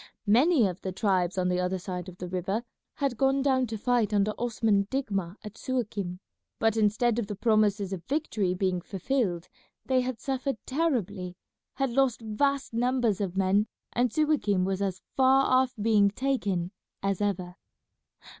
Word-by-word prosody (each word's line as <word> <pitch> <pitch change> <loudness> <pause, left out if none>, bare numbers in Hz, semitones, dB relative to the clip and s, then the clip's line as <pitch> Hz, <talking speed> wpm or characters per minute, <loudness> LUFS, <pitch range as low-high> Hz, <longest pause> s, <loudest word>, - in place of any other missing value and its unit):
Many 250 +5 +4
of 185 -1 -3
the 190 - -3
tribes 185 -2 0
on 180 -1 +1
the 180 0 +1
other 180 +1 0
side 180 0 -5
of 180 - -13
the 180 - -6
river 190 +5 -2 0.3
had 275 -5 -1
gone 270 0 +3
down 260 -2 +2
to 220 0 -4
fight 220 -2 +1
under 205 +1 +2
Osman 225 -4 +1
Digma 200 -10 -2
at 210 0 -10
Suakim, 210 -8 -3 0.4
but 225 -1 +2
instead 220 +2 +2
of 220 - -2
the 205 - -4
promises 205 -2 +2
of 175 -3 -5
victory 230 - -1
being 185 -1 0
fulfilled 190 -2 -2 0.4
they 260 -1 +2
had 250 -2 -3
suffered 270 -1 -2
terribly, 210 - -1 0.4
had 270 -2 0
lost 265 -1 +2
vast 260 +5 -1
numbers 240 -3 +1
of 190 -2 -3
men, 195 +3 +3 0.3
and 245 0 +1
Suakim 265 -11 +2
was 195 0 -1
as 190 -2 -2
far 265 +1 +5
off 255 0 +2
being 210 -1 +4
taken 200 -7 -1 0.3
as 195 0 0
ever. 185 -3 -2
215 Hz, 165 wpm, -28 LUFS, 190-255 Hz, 0.4 s, far